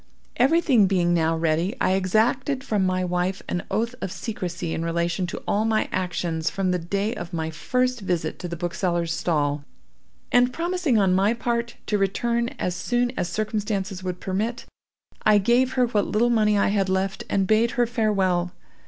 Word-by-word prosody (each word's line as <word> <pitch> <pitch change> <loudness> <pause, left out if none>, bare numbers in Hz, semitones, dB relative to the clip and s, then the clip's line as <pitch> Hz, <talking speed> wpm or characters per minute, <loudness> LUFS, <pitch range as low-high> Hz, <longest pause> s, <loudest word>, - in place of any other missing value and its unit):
"Everything 265 - +4
being 175 -2 +2
now 165 -1 +2
ready, 165 +6 0
I 185 - +2
exacted 225 +8 +1
from 210 -7 +1
my 185 0 0
wife 180 +2 -1
an 175 - -2
oath 230 +2 -1
of 185 - -3
secrecy 180 -5 -4
in 165 - -2
relation 170 +2 -1
to - - -6
all 205 +1 +1
my 220 -1 +1
actions 175 -3 -1
from 190 -2 -1
the 180 - 0
day 200 +6 -1
of 175 -6 -7
my 160 -1 -2
first 250 +9 0
visit 175 -4 -2
to 180 - -5
the 170 - -5
bookseller's 170 0 -1
stall; 145 -4 0 0.7
and 245 +1 +4
promising, 340 -5 0
on 195 -3 +3
my 200 +5 +3
part, 235 0 -2
to 210 - 0
return 235 +4 0
as 180 - -2
soon 245 +5 0
as 175 - -2
circumstances 205 -3 -2
would 180 -1 -4
permit, 215 +6 -2 0.6
I 215 -1 +5
gave 240 +5 +3
her 255 -1 +3
what 215 -4 0
little 235 +3 +2
money 210 -2 +3
I 200 - +3
had 195 -2 +1
left, 190 +1 -1
and 195 -1 +1
bade 220 +4 +3
her 240 - +4
farewell. 190 -6 0
195 Hz, 180 wpm, -24 LUFS, 175-235 Hz, 0.7 s, I